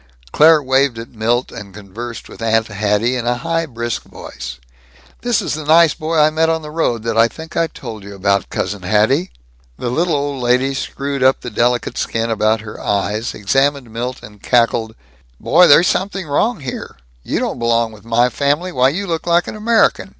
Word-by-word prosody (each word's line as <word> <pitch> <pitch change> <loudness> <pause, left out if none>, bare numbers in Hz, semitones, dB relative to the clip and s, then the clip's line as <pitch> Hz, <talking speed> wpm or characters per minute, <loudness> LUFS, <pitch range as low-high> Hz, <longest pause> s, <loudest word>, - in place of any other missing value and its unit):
Claire 155 -1 +5
waved 130 -1 +2
at 115 +1 -8
Milt 120 +3 0
and 100 -4 -10
conversed 110 +4 -8
with - - -13
Aunt 115 0 +2
Hatty 105 +3 0
in 120 -2 -3
a 120 0 +1
high 165 +4 -2
brisk 120 -3 -4
voice: - - -9 0.6
"This 240 -3 0
is - - -2
the 155 0 -4
nice 160 +1 +5
boy 160 0 -3
I 155 0 +5
met 160 +1 +1
on 160 -1 -1
the 150 - -8
road 120 -8 -1
that 115 -1 -2
I 115 - +6
think 160 +8 -11
I 165 - +2
told 115 -9 -9
you 100 0 -10
about, 100 0 0
Cousin 105 -2 -3
Hatty." 110 - +2 0.5
The 120 - -3
little 165 +4 +1
old 140 -2 -2
lady 125 +3 +2
screwed 140 +1 -4
up 130 +1 +3
the 120 - -6
delicate 120 +3 0
skin 115 0 -1
about 110 0 +1
her 105 -1 -9
eyes, 105 +3 -1
examined 135 +4 0
Milt, 125 +2 -4
and 105 -1 -13
cackled, 115 -2 +1 0.4
"Boy, 175 +3 +5
there's 165 +5 +6
something 190 -1 -1
wrong 180 +9 0
here. 130 -2 -7 0.2
You - - -3
don't - - -2
belong 115 -1 +1
with 105 -1 -15
my 115 +2 +2
family. 145 +8 0
Why, 130 -2 +3
you 190 +8 -3
look 165 -2 -3
like 170 0 +3
an - - -6
American. 225 +2 +2
125 Hz, 195 wpm, -17 LUFS, 115-155 Hz, 0.6 s, I